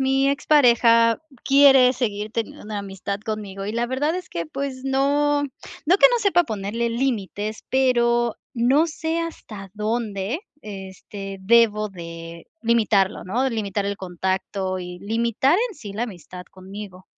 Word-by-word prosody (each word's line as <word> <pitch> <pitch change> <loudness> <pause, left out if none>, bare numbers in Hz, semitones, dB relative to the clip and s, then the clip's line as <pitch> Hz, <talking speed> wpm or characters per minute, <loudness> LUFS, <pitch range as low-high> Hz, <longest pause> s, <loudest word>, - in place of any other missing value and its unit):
mi 270 +1 +2
expareja 235 -5 +4 0.2
quiere 270 -2 +6
seguir 215 -4 -3
teniendo 230 -2 -4
una 210 -1 -4
amistad 200 0 -5
conmigo, 205 -2 -5
y 210 - -3
la 235 +1 0
verdad 285 +6 0
es 365 - -6
que, 170 -1 -4
pues, 260 - -5
no 285 +2 +2
no 295 +5 -2
que - - +9
no 485 - +2
sepa 380 -5 +3
ponerle 220 0 -2
límites, 220 -4 -2
pero 240 -3 +2 0.2
no 260 +7 +3
sé, 320 +1 -2
hasta 215 - -7
dónde, 215 - -2 0.2
este, 195 0 -8
debo 215 -1 +4
de 165 -2 -9 0.2
limitarlo, 220 -4 +2
¿no?, 225 +8 -1
de 265 - +1
limitar 205 -3 -2
el 200 0 -3
contacto 185 +1 -2
y 180 0 -7
limitar 235 - +1
en 430 - -11
sí, 210 - -9
la 220 +4 -2
amistad 180 -4 -10
conmigo. 190 0 -10
225 Hz, 145 wpm, -23 LUFS, 195-265 Hz, 0.2 s, que